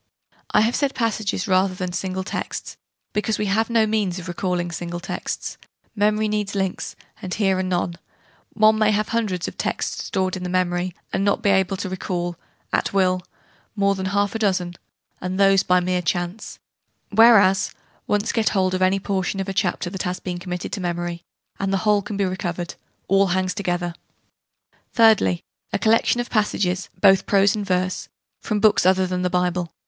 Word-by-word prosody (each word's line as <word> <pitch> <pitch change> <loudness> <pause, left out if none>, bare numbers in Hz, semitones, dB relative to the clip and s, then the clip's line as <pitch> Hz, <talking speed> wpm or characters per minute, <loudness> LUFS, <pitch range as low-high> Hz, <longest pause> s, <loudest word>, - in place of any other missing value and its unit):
I 210 - +4
have 230 +3 +2
said 280 -2 0
'passages,' 220 -3 -1
rather 185 0 +2
than 180 -1 -3
single 190 +1 -2
texts, - - -5 0.4
because 210 +1 0
we 210 - -1
have 215 +4 +1
no 230 -2 +3
means 210 -4 0
of 180 -1 -7
recalling 175 -1 -2
single 175 0 -5
texts: 180 0 -5 0.4
memory 210 +1 +2
needs 210 -1 -2
links, 190 -2 -2 0.3
and 185 - -6
here 195 -3 +2
are - - +2
none: 175 -2 -1 0.5
one 215 0 +4
may 215 -1 +4
have 215 0 +1
a - - -7
hundred 215 -6 0 0.2
texts - - -2
stored 185 -1 -1
in 185 - -6
the 180 - -3
memory, 180 -1 0 0.2
and 195 - +1
not 200 0 +1
be 200 - +4
able 190 0 +2
to 195 - -4
recall, 175 -1 -3 0.4
at - - +1
will, 185 -2 +2 0.5
more 200 -1 +2
than 190 -1 -3
half 200 +1 +1
a 225 - -3
dozen 185 -4 0 0.5
and 185 +1 -3
those 195 -1 +5
by 180 0 +3
mere 180 0 0
chance: 175 +4 -3 0.5
whereas, 205 -3 +6 0.4
once 205 0 +1
get 225 -2 +2
hold 185 -2 +1
of 185 - -1
any 185 +1 +3
portion 195 0 -2
of 195 - -2
a 195 - -3
chapter 185 -3 -1
that 190 - -4
has 180 0 -2
been 180 -1 -5
committed 180 -1 -5
to 200 - -3
memory, 175 -1 -3 0.4
and 195 0 -1
the 195 - +2
whole 210 -1 +4
can 200 +1 -5
be 200 - +1
recovered: 175 -2 -3 0.3
all 195 +1 +4
hangs 185 0 0
together. 175 -3 -2 1.0
Thirdly, 215 - +4 0.3
a - - +1
collection 225 +2 +3
of 240 - -3
passages, 190 -4 0
both 195 -2 +5
prose 200 +1 +4
and 210 - -2
verse, 185 0 -1 0.3
from 210 -2 -1
books 210 0 +4
other 185 0 +4
than 180 0 -2
the 180 - +1
Bible. 180 -1 0
190 Hz, 185 wpm, -22 LUFS, 180-205 Hz, 1.0 s, whereas